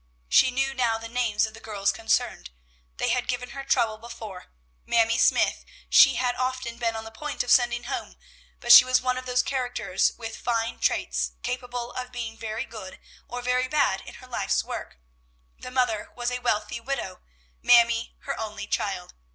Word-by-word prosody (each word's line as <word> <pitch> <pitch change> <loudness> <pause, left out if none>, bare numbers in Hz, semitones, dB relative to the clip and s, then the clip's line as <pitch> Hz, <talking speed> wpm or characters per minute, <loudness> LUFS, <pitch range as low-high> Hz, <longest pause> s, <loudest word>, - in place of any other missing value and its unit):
She 255 - +5
knew 270 +1 -1
now 240 -4 +1
the 225 0 -8
names 230 -3 +1
of 220 - -9
the 225 - -11
girls 205 -3 -1
concerned: 220 - -1 0.5
they - - 0
had 250 - 0
given 250 0 -3
her 275 - -6
trouble 235 -5 +1
before. 220 -5 -9 0.4
Mamie 230 +1 +2
Smythe - - +3 0.3
she 270 -3 +8
had 250 0 +1
often 255 -2 -3
been 230 -2 0
on 220 - -5
the 225 - -10
point 295 +6 -4
of 245 - -2
sending 240 -1 +4
home, 250 - -5 0.4
but 240 - +1
she - - +12
was 255 0 +3
one 255 0 -1
of 255 - -10
those 250 0 +2
characters 245 -8 0
with 225 -1 -6
fine 230 -1 -2
traits, - - 0
capable 245 -1 -4
of 255 0 -6
being 230 -2 -5
very 225 0 -4
good 190 -4 -10 0.3
or 245 0 -6
very 250 +1 +1
bad 255 -9 +1
in - - -11
her 255 - -13
life's 250 - 0
work. - - -7 0.6
The - - -8
mother 250 -4 0
was 245 0 -2
a 250 - -2
wealthy 215 -1 -1
widow, 230 -7 -4 0.4
Mamie 235 -1 +4
her 275 - -4
only 215 -2 -5
child. 190 -3 -3
240 Hz, 185 wpm, -26 LUFS, 225-250 Hz, 0.6 s, she